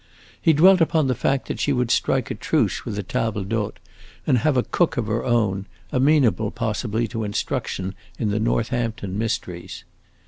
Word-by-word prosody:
He 165 - +5
dwelt 185 +4 +6
upon 160 -2 +3
the 130 - +2
fact 135 +3 0
that - - -4
she 145 - +1
would 125 -3 +1
strike - - +1
a - - 0
truce - - 0
with - - -4
tables 105 -2 -1
d'hote 105 0 -2 0.5
and 125 - +3
have 150 +1 +2
a 125 - +3
cook 175 - 0
of 120 - 0
her 110 +2 -1
own, 110 -6 +1 0.2
amenable 130 - +3
possibly 110 +1 -2
to 115 -2 -3
instruction 95 -2 -2 0.2
in 105 -3 -1
the 105 - 0
Northampton 115 -3 -1
mysteries. 105 -5 -4
115 Hz, 170 wpm, -23 LUFS, 105-130 Hz, 0.5 s, dwelt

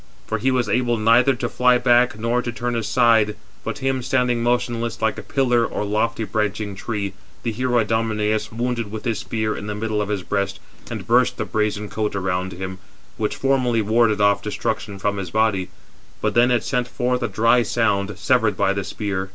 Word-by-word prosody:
For - - -2
he 135 - +1
was 125 -3 +1
able 120 +2 +1
neither 115 +5 +4
to - - -2
fly 125 0 +3
back 120 -2 +3
nor 115 +2 0
to 120 - -4
turn 120 0 -3
aside, 115 -2 +3 0.3
but 115 - -4
him, 135 -1 +1
standing 125 -2 +1
motionless, 120 -1 -1
like 110 -1 0
a - - -5
pillar 125 -4 +1
or 105 - -2
lofty 110 +2 0
branching 105 -1 -2
tree, 100 -1 -4 0.3
the 115 - -1
hero 125 +2 0
Idomeneus 110 -1 0
wounded 115 -1 -2
with 110 -1 -6
his 115 -3 0
spear 110 -2 -2
in 105 - -6
the 105 - -3
middle 110 0 -1
of 105 - -2
the 105 0 -1
breast, 100 -1 -1 0.3
and - - -5
burst - - +3
the - - -2
brazen 105 -1 -1
coat 105 0 -2
around 95 -1 -1
him, 95 +1 -6 0.4
which 105 -2 -1
formerly 125 -4 +1
warded 110 0 +3
off 100 0 +3
destruction 105 0 -3
from 100 +1 -1
his 95 -3 -4
body: 105 -3 +1 0.5
but 105 -1 0
then 120 +1 +4
it 120 -2 +2
sent 125 -2 -1
forth 125 0 -1
a - - 0
dry 115 +2 +3
sound, 105 -4 0
severed 120 -4 +2
by 95 - +2
the 100 0 -2
spear. 95 -1 -3
110 Hz, 195 wpm, -22 LUFS, 105-120 Hz, 0.5 s, neither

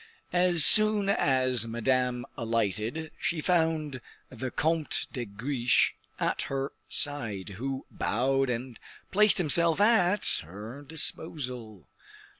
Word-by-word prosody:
As 175 -3 +6
soon 215 -2 +7
as 130 - +1
Madame 125 +1 -1
alighted, 115 - -2
she 175 -6 -2
found 160 -5 -1 0.3
the 130 +1 -6
Comte 160 +3 -1
de 125 -2 -4
Guiche 120 +4 0 0.3
at - - -1
her 135 0 -3 0.2
side, 115 -10 -1
who 135 0 -4
bowed 135 +4 -1
and 120 0 -5 0.3
placed 210 +1 +4
himself 170 0 +3
at 205 -2 +2
her 105 - -10
disposal. 130 - -5
135 Hz, 105 wpm, -27 LUFS, 120-160 Hz, 0.3 s, soon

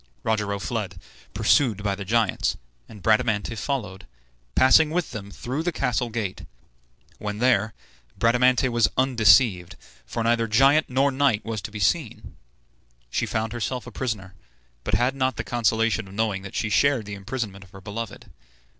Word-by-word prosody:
Rogero 105 -2 0
fled, 100 -3 -4 0.4
pursued 110 -8 +2
by 100 -1 0
the 100 +1 -5
giants, 110 +1 +1 0.3
and 105 -4 -13
Bradamante 110 0 +2
followed, 105 -5 -4 0.5
passing 150 +4 +6
with 175 +1 -2
them 100 -2 -7
through 130 +8 -4
the 175 +2 -1
castle 125 -5 -1
gate. 110 -5 -4 0.7
When 105 -1 -4
there, 110 -4 +2 0.4
Bradamante 125 +2 +3
was 120 -2 +3
undeceived, 115 -7 +4 0.3
for 115 - -3
neither 115 0 +2
giant 135 +8 +4
nor 135 +2 +2
knight 130 -6 +1
was 110 -2 -3
to 100 - -6
be 105 - -8
seen. 90 - -1 0.8
She - - -1
found 110 +1 -2
herself 120 +1 -3
a 125 - -9
prisoner, 105 -6 -4 0.5
but - - 0
had 125 +2 +2
not 130 -3 0
the 115 - -2
consolation 115 -1 0
of 95 - -12
knowing 105 -3 0
that 95 -1 -9
she 110 - -1
shared 135 -1 +3
the 100 - -7
imprisonment 100 -1 -5
of 95 - -18
her 95 +1 -13
beloved. 110 +2 -6
115 Hz, 160 wpm, -24 LUFS, 100-125 Hz, 0.8 s, passing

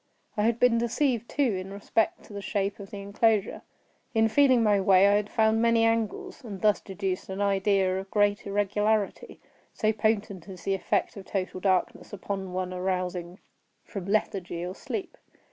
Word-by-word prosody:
I 210 - +1
had 230 0 +1
been 245 -2 +4
deceived, 235 0 0
too, 290 - +1
in 185 +1 -5
respect 205 +2 -1
to - - -14
the 200 - -5
shape 200 0 -2
of 195 -1 -9
the 200 - -7
enclosure. 205 +1 +1 0.5
In 225 0 +4
feeling 260 -2 +4
my 205 -2 +3
way 190 0 +6
I - - +5
had 205 0 +1
found 220 0 +2
many 230 -1 +3
angles, 230 - -1
and 205 -5 -7
thus 210 0 +3
deduced 195 -1 -4
an 190 +1 -5
idea 195 -1 +2
of 195 0 -8
great 205 0 +1
irregularity; 205 +1 0 0.4
so 215 0 +1
potent 205 -5 -1
is 185 -2 -10
the 195 - 0
effect 195 +2 -1
of 195 - -9
total 185 -1 -3
darkness 185 +2 0
upon 195 -1 -4
one 185 0 -3
arousing 180 -1 -3 0.5
from 195 -4 -6
lethargy 185 -4 -1
or 180 - -5
sleep! 375 - -6
200 Hz, 175 wpm, -27 LUFS, 190-220 Hz, 0.5 s, way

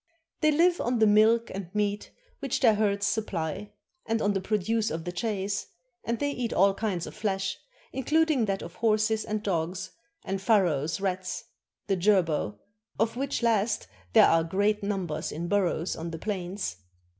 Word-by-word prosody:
They 310 - +4
live 345 +4 +3
on 245 +1 0
the 220 - +5
milk 220 +2 +4
and 190 -2 -6
meat 205 0 -1 0.3
which 275 -3 -1
their 230 -4 +6
herds 205 -1 +1
supply, 205 -2 -2 0.4
and 225 0 +1
on 205 -1 +1
the 195 - -1
produce 215 +2 0
of 160 +1 -4
the 175 - -3
chase; 200 +1 -2 0.4
and 235 0 -1
they 285 +2 -1
eat 245 -4 -3
all 195 +1 +4
kinds 195 -5 -2
of - - -8
flesh, 195 -2 -2 0.3
including 300 -1 +2
that 195 -1 -2
of 170 - -8
horses 220 -1 +2
and 215 0 -3
dogs, 185 0 -2 0.3
and 195 0 -2
Pharaoh's 170 - +2
rats 185 -1 -2 0.4
[the 195 - +1
jerboa], 175 - +2 0.4
of 225 +1 +1
which 270 -1 -2
last 225 -1 +1 0.3
there - - +8
are 165 0 +4
great 205 +5 +1
numbers 190 -6 -2
in 170 +3 -4
burrows 185 -3 0
on 165 +1 -5
those 165 -1 -6
plains. 190 - -3
205 Hz, 165 wpm, -28 LUFS, 185-225 Hz, 0.4 s, there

